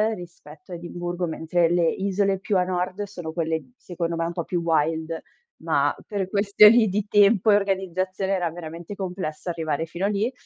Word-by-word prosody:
rispetto 175 +2 -13
a - - -3
Edimburgo, 175 +1 -4
mentre 165 +1 +1
le 175 -1 +2
isole 195 0 0
più 195 0 0
a 180 - +3
nord 185 +2 -2
sono 175 -6 -7
quelle 160 -5 -2
secondo 170 -1 -4
me 165 - 0
un 170 - -2
po' 170 -2 -3
più 175 -2 -2
wild. 160 0 0 0.4
Ma - - +1
per 200 -3 -2
questioni 210 +3 +6
di 205 +2 -1
tempo 205 0 +5
e - - +6
organizzazione 190 -1 -1
era 175 -3 0
veramente 170 +3 -8
complesso 180 -3 -5
arrivare 160 -2 -2
fino 175 +4 -4
a - - +2
lì. 210 +5 0
180 Hz, 180 wpm, -24 LUFS, 165-195 Hz, 0.4 s, questioni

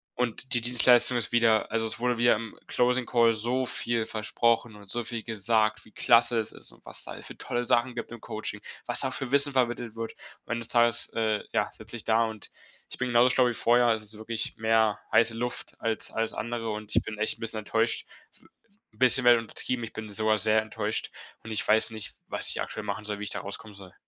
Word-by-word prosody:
und 125 +1 -2
die 120 - +2
Dienstleistung 120 +1 +5
ist 115 - -2
wieder 115 -3 +3
also, 115 0 +1
es 110 - -5
wurde 125 -1 0
wieder 120 -1 +4
im 110 0 -7
Closing 125 0 +1
Call 115 -2 +3
so 120 +4 -1
viel 120 -2 -1
versprochen 115 +1 0
und 100 -2 -15
so 120 +2 -2
viel 115 0 -4
gesagt, 110 0 0
wie 110 - -19
klasse 120 0 +4
es 110 - -2
ist - - -4
und - - -21
was - - -4
da - - -8
für - - -9
tolle 120 0 -3
Sachen 120 +1 +1
gibt 120 - -6
im 120 - -10
Coaching, 110 -1 -5 0.2
was - - +3
da 130 - 0
für 135 -1 -4
Wissen 140 0 +6
vermittelt 120 -3 -1
wird. 115 0 -5 0.3
Am 115 - -3
Ende 120 - -2
des - - -2
Tages, 120 -1 +2
äh, 110 -2 0
ja, - - +1
sitze 110 +2 -8
ich 115 - -8
da 115 +1 +3
und 110 -2 -7 0.4
ich - - -4
bin 125 - -2
genauso 120 +1 +4
schlau 130 - +3
wie 120 - -1
vorher. 120 +1 +3
Also, 110 -2 +1
es 105 - -7
ist 105 - -12
wirklich 110 0 -2
mehr 110 -1 +2
heiße 115 -1 +4
Luft 120 +1 -4
als 115 -1 -2
alles 115 0 -1
andere 115 -1 -4
und 105 0 -5
ich - - +3
bin 110 - -7
echt 110 +1 0
'n - - -18
bisschen 110 -1 -2
enttäuscht. 115 +2 -1 0.3
W - - -23 0.5
'n - - -25
bisschen 130 0 +6
wäre 120 -1 +7
untertrieben. 115 +2 -4
Ich - - -11
bin 110 -1 -7
sogar 110 +1 +1
sehr 110 0 +3
enttäuscht 110 0 -3 0.3
und 110 - -8
ich 100 -6 -1
weiß 110 +1 +4
nicht, 110 -1 -5
was - - +3
ich - - +4
aktuell - - -7
machen 105 - -4
soll, 105 -1 -4
wie 105 - -5
ich - - -2
da - - -2
rauskommen 100 +1 -7
soll. 95 -2 -13
115 Hz, 235 wpm, -27 LUFS, 110-120 Hz, 0.5 s, wäre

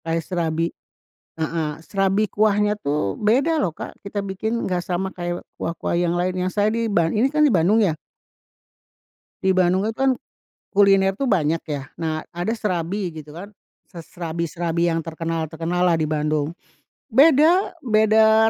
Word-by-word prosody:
Kayak 165 0 -1
serabi 165 -2 -1 0.7
heeh, 160 -1 -1 0.2
serabi 195 +1 +1
kuahnya 210 0 +2
tuh 140 -9 0
beda 270 +10 +2
loh, 185 - +1
Kak, - - -8
kita 200 +1 -4
bikin, 220 +4 -2
nggak 180 -1 -1
sama 185 +2 -2
kayak 175 0 -4
kuah-kuah 170 +1 -3
yang 175 0 +1
lainnya. 180 +1 -1
Saya 205 +1 +1
di 230 0 -1
ba 170 -5 +2
ini 220 +10 +2
kan 300 +1 +3
di 280 - +3
Bandung 185 +6 +4
ya. 185 -8 +2 1.5
Di 190 - +3
Bandung 185 +1 +3
itu 225 - -6
kan, 270 0 +3 0.6
kuliner 195 -1 +4
tuh 275 - -1
banyak 165 - +2
ya. 145 -3 -5
Nah, 160 -1 -2
ada 175 +6 -2
serabi 190 -3 -2
gitu 155 -2 -10
kan. 185 +5 -8 0.4
Se 170 -4 -10
serabi-serabi 170 0 -2
yang 165 - 0
terkenal-terkenal 165 +1 -3
lah 175 -2 +3
di 155 - 0
Bandung. 150 0 -1 0.5
Beda 310 - +4
beda, 220 0 +5
180 Hz, 155 wpm, -22 LUFS, 165-215 Hz, 1.5 s, beda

